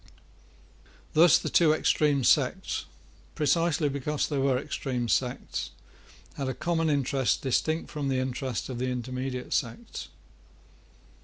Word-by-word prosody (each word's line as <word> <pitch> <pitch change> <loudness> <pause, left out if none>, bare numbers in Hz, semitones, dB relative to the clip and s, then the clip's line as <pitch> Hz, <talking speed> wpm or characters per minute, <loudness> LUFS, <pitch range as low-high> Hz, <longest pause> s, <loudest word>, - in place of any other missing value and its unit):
Thus 165 +1 +7
the - - -4
two 160 -3 +4
extreme 150 -3 +2
sects, - - +2 0.5
precisely 165 0 +2
because 140 +1 -1
they 145 -3 -1
were 135 -1 +2
extreme 125 -2 -3
sects, 125 +2 -1 0.7
had 135 -2 -2
a 130 - -3
common 165 -2 0
interest 135 -5 +1
distinct 155 +5 0
from 150 -3 -3
the 135 -1 0
interest 130 -1 -2
of 125 -2 -5
the 130 +1 -1
intermediate 125 +1 -4
sects. 225 - -3
135 Hz, 125 wpm, -28 LUFS, 130-150 Hz, 0.7 s, Thus